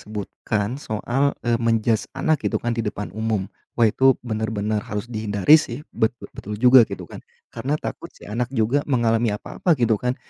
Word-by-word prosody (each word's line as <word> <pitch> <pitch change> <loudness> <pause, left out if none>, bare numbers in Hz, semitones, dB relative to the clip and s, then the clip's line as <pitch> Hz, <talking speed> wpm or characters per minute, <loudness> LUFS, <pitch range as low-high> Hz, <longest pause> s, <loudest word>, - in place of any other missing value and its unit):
sebutkan 105 +3 -4
soal, 135 +4 -1
eee, 120 -1 +1
men-judge 115 -1 +1
anak 155 -3 +1
gitu - - -1
kan 120 - -2
di 115 - -1
depan 105 -2 -4
umum, 110 -2 -1 0.3
wah 120 - +4
itu 130 +4 +4
benar-benar 110 -2 -2
harus 105 0 -3
dihindari 110 +7 +4
sih, 135 +2 -6
bet 110 +2 0 0.2
betul 105 +1 -7
juga 125 +3 +7
gitu - - -6
kan. - - -10 0.3
Karena 135 +6 -2
takut 170 - -6
sih - - -14
anak 115 +3 -2
juga 115 +6 +2
mengalami 115 -3 +2
apa-apa 165 - -1
gitu 115 -4 +1
kan, 125 +1 -1
115 Hz, 175 wpm, -22 LUFS, 110-125 Hz, 0.3 s, juga